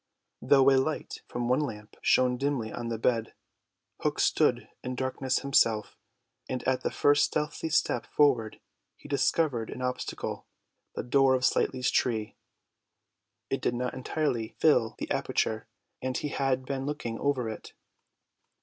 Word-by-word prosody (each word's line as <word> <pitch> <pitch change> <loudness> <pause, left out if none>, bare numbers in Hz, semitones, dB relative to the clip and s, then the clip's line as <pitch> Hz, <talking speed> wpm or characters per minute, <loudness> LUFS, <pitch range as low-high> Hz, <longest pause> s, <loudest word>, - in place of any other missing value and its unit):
Though 135 -1 +5
a 135 - +5
light 155 +3 -4
from 120 - -4
the 120 - -1
one 125 - +3
lamp 105 -8 -5
shone 125 -1 +3
dimly 130 -4 -2
on 120 - -4
the 115 -1 -2
bed, 115 0 0 0.6
Hook - - -1
stood - - +2 0.2
in 125 0 -4
darkness 130 0 -1
himself, 115 -6 +2 0.5
and 130 -1 -3
at 130 -1 +1
the - - -1
first 145 0 +4
stealthy 150 +1 -2
step 155 - +1
forward 125 -7 +2 0.4
he - - -14
discovered 140 -4 +1
an 130 - -6
obstacle, 125 0 -4 0.5
the - - -3
door 135 +1 +4
of 130 0 +1
Slightly's 130 0 +1
tree. 110 -4 0 1.2
It - - -1
did 120 - 0
not 125 +1 -2
entirely 130 -4 -2
fill 125 -8 +3
the - - -5
aperture, 110 0 -1 0.3
and 130 0 -2
he 150 - -3
had 135 -2 0
been 135 0 -3
looking 120 -6 -4
over 135 -4 0
it. 110 - -7
130 Hz, 150 wpm, -29 LUFS, 115-140 Hz, 1.2 s, Though